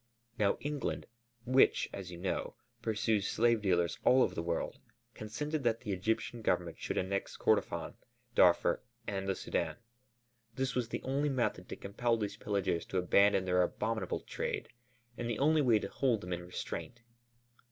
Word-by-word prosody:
Now 100 -2 +3
England 145 -3 -2 0.4
which, 130 +2 +4
as 95 -2 -6
you 85 - -7
know, 90 +2 -2 0.3
pursues 110 -2 +1
slave 115 -1 +3
dealers 85 -5 +1
all 130 +1 +6
over 90 - 0
the 85 - -2
world, 85 0 -2 0.3
consented 150 +8 -3
that 115 -1 +1
the 110 -5 -4
Egyptian 110 +4 -1
Government 85 -5 0
should - - -3
annex 100 +1 -2
Kordofân, - - +1 0.4
Darfur, - - +4 0.2
and 95 -1 -3
the - - +3
Sudân. 80 -3 -2 0.8
This 135 +1 -1
was 120 -2 -1
the - - -4
only 140 +3 0
method 130 -3 -1
to - - -4
compel 115 +4 0
these 105 -2 -3
pillagers 95 -4 -1
to 95 - -2
abandon 95 +2 +4
their 90 0 +3
abominable 90 - -1
trade - - -3 0.5
and 120 -1 -2
the 115 - -1
only 155 +2 +4
way 120 -5 +5
to - - -3
hold 120 -6 +1
them 90 0 -4
in 90 0 -5
restraint. 115 +6 -5
105 Hz, 165 wpm, -33 LUFS, 95-120 Hz, 0.8 s, all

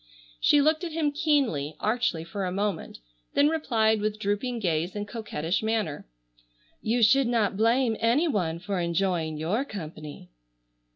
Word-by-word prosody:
She 290 - +5
looked 310 +3 +2
at 335 -3 -4
him 310 -2 +1
keenly, 280 - 0
archly 215 -7 0
for 195 +4 -5
a 180 - -2
moment, 200 -2 -2 0.4
then 285 +1 +5
replied 225 -9 +1
with 215 0 -1
drooping 215 +4 -2
gaze 175 -3 -1
and 205 0 -4
coquettish 190 -7 -2
manner: 220 - -2 0.7
"You 230 +2 +1
should 270 +4 +5
not 225 -4 +1
blame 230 +2 +2
any 245 +9 +3
one 175 - -1
for 185 +2 -3
enjoying 170 -2 0
your 180 - 0
company." 155 - -9
215 Hz, 150 wpm, -27 LUFS, 175-245 Hz, 0.7 s, She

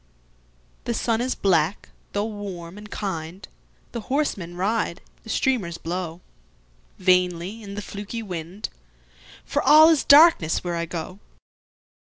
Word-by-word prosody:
The 235 - -1
sun 230 0 0
is 255 +1 -1
black, 180 -1 +1 0.2
tho' 205 +1 0
warm 200 -4 -7
and 210 0 -11
kind, 185 -3 -5 0.4
The 235 - -5
horsemen 210 - -2
ride, 195 -1 -1 0.2
the - - -14
streamers 215 -10 0
blowVainly 170 - -3
in 200 -2 -8
the 205 - -5
fluky 205 +4 -6
wind, 180 +1 -6 0.8
For - - 0
all 310 +2 +8
is 320 -4 +3
darkness 290 - +6
where 175 -1 -2
I 170 0 -2
go. 175 +3 -6
190 Hz, 125 wpm, -24 LUFS, 170-220 Hz, 0.8 s, all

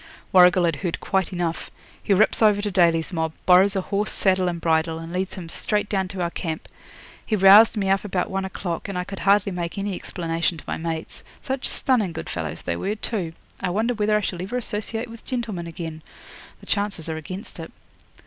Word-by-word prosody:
'Warrigal 180 -1 +6
had 165 -3 0
heard 175 -1 -3
quite 190 -2 0
enough. 175 -2 -3 0.3
He - - -3
rips 205 +4 +4
over 210 -2 +5
to 205 0 -2
Daly's 170 -1 +2
mob, 160 -1 -1
borrows 190 +2 +6
a 190 - +1
horse, 200 +2 -1
saddle, 185 -2 +2
and 170 -1 -2
bridle, 160 0 +1
and 165 +1 -8
leads 185 +1 -2
him 175 -3 -7
straight 210 +5 -1
down 190 -2 0
to 190 -1 -5
our 170 -1 -1
camp. 160 -3 -4 0.6
He 220 - 0
roused 205 +3 +7
me 195 -2 0
up 195 0 +2
about 190 -3 -1
one 195 0 -1
o'clock, 190 -1 -4
and 195 - -3
I 180 - -1
could 195 +1 -8
hardly 200 0 +3
make 175 0 -4
any 200 0 -2
explanation 165 -1 -2
to - - -11
my - - -3
mates. 160 -1 -5 0.2
Such 265 0 -3
stunning 220 -10 +1
good 160 - -6
fellows 80 -2 -4
they 85 - -2
were, 200 - -2
too! 200 -6 -3 0.3
I - - 0
wonder 220 +7 0
whether 210 -1 +2
I - - -1
shall 180 -3 -3
ever 205 +7 -3
associate 225 0 -3
with 230 -1 -12
gentlemen 220 -9 -4
again? 160 -1 -6 0.6
The - - -13
chances 200 -5 -1
are 160 -1 -3
against 185 +7 -8
it. - - -7
185 Hz, 210 wpm, -23 LUFS, 170-205 Hz, 0.6 s, roused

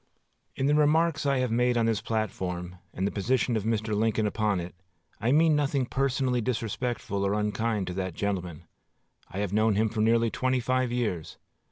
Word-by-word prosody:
In 135 - -1
the 145 - +3
remarks 150 +1 +3
I 140 -1 +2
have 125 -2 0
made 125 +1 +2
on 115 - +2
this 115 -2 +1
platform, 90 -5 -3
and 95 - -2
the 100 - 0
position 120 +3 0
of 110 -2 -1
Mr. 110 -1 -1
Lincoln 110 0 +1
upon 105 -2 0
it, 85 +1 -6 0.5
I 115 +4 +1
mean 155 +2 +5
nothing 140 -2 +1
personally 130 -1 0
disrespectful 115 -3 -2
or 100 +1 +1
unkind 105 0 -1
to 90 - -4
that 95 -2 -3
gentleman. 90 -5 -3 0.7
I 95 - -8
have 100 -1 -2
known 110 0 +3
him 110 +2 +2
for 110 0 -2
nearly 115 +1 +3
twenty 130 0 0
five 130 0 0
years. 110 -10 -2
110 Hz, 185 wpm, -27 LUFS, 100-130 Hz, 0.7 s, mean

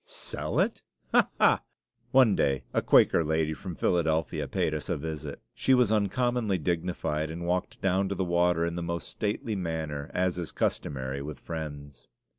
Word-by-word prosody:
"Sell - - -4
it? - - +1 0.3
Ha! - - +4
ha!" - - +5 0.5
One 130 -6 +5
day 70 -1 +1
a - - +2
Quaker 85 - +5
lady 80 0 0
from 90 +1 -7
Philadelphia 80 -4 0
paid - - 0
us - - -4
a - - 0
visit. 75 -1 -5
She 130 - +3
was 125 -4 +3
uncommonly 110 0 +1
dignified, 80 -2 -1
and 85 +2 -5
walked 90 +1 -1
down 95 0 +1
to 100 - -2
the 95 - -1
water 85 -1 +2
in 85 - -2
the 85 - -3
most 85 0 -3
stately 105 +1 -2
manner, 80 -5 -3
as 90 -1 0
is 85 - -4
customary 65 0 -2
with 70 -2 -7
Friends. 70 -4 -7
85 Hz, 170 wpm, -28 LUFS, 75-95 Hz, 0.5 s, ha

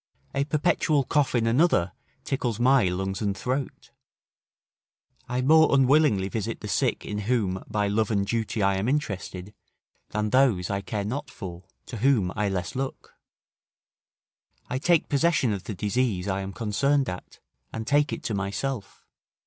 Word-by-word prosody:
A 140 0 0
perpetual 150 -1 +1
cough 140 0 +1
in 115 -2 +2
another 115 - +3 0.3
tickles 120 -5 -2
my 130 -1 +4
lungs 95 +2 -2
and 100 -2 -1
throat. 130 +5 -4 1.4
I 125 0 -1
more 160 +3 +6
unwillingly 135 -7 +4
visit 110 +2 -4
the 105 - -5
sick 100 - 0
in 105 0 -3
whom 100 -7 0
by 105 -2 0
love 105 +1 +1
and 100 -3 +1
duty 110 -1 -1
I 95 0 +2
am 100 +6 -1
interested, 100 -8 -3 0.6
than 105 0 -2
those 115 -9 +3
I 100 0 -1
care 105 -1 -3
not 135 +6 -4
for, 90 -7 -8 0.2
to 120 - -7
whom 110 -6 +2
I 105 0 0
less 90 +1 -3
look. 135 0 -5 1.6
I 130 - -1
take 170 +2 +3
possession 145 -5 +2
of 100 -2 -5
the 105 - -5
disease 105 -1 -1
I 95 0 -1
am 95 0 -5
concerned 130 +6 +1
at, 90 0 -7 0.3
and 110 0 -5
take 145 +3 +2
it - - -5
to 115 - -2
myself. 100 +3 -4
110 Hz, 155 wpm, -26 LUFS, 100-135 Hz, 1.6 s, more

